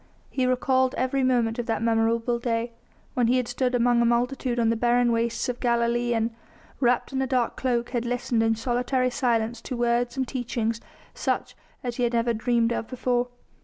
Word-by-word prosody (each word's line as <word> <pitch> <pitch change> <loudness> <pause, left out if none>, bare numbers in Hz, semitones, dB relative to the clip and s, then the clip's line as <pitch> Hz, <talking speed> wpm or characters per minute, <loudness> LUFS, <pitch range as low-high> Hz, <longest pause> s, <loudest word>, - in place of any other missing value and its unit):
He 255 -2 0
recalled 260 0 +2
every 260 +2 0
moment 240 -3 +1
of 240 - -3
that 225 0 -1
memorable 230 +1 +1
day 235 0 -1 0.4
when 245 -2 +2
he 250 +2 +3
had 250 -2 0
stood 250 0 0
among 240 0 +3
a - - +3
multitude 245 +1 0
on 230 -1 +3
the - - +1
barren 240 +1 +2
wastes 230 0 0
of 250 -1 -3
Galilee 235 0 +1
and, 225 +1 0 0.5
wrapped 245 +1 +1
in 265 - 0
a 265 - 0
dark 250 -2 0
cloak, 240 -2 -1
had 240 -2 -1
listened 240 -1 0
in 225 0 +2
solitary 250 +2 0
silence 235 -2 0
to 250 - -5
words 240 +1 0
and 260 -1 0
teachings 235 -3 -2 0.3
such - - -2 0.3
as 245 -1 -4
he 250 - 0
had 240 0 +1
never 235 0 +2
dreamed 235 +1 +1
of 225 - -3
before. 250 -1 0
240 Hz, 195 wpm, -25 LUFS, 235-250 Hz, 0.5 s, he